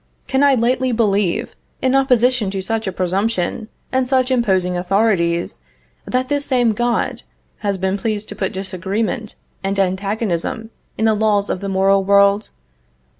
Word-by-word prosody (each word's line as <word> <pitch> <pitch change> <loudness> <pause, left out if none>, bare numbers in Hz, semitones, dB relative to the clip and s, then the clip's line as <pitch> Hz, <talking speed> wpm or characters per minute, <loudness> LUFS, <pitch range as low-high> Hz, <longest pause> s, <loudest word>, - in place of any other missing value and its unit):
Can 265 +1 0
I 280 -1 +5
lightly 255 +2 +1
believe, 210 -2 0 0.2
in 260 0 +1
opposition 250 -4 +3
to 195 0 -3
such 225 +2 -2
a - - 0
presumption 185 +3 -1 0.2
and 260 -1 +1
such 260 -1 +2
imposing 190 -7 +1
authorities, 175 -2 +1 0.5
that 255 +1 0
this 285 +1 0
same 245 -4 +2
God 240 +2 -1 0.4
has 200 -2 -1
been 190 +1 -1
pleased 215 0 -2
to - - -7
put 190 - -2
disagreement 195 +4 -3 0.3
and 195 +1 -1
antagonism 195 +2 -1 0.3
in 220 - +1
the 220 - +4
laws 210 -1 +1
of - - -2
the 195 - -4
moral 195 +1 +3
world? 200 +1 +3
210 Hz, 150 wpm, -19 LUFS, 190-240 Hz, 0.5 s, I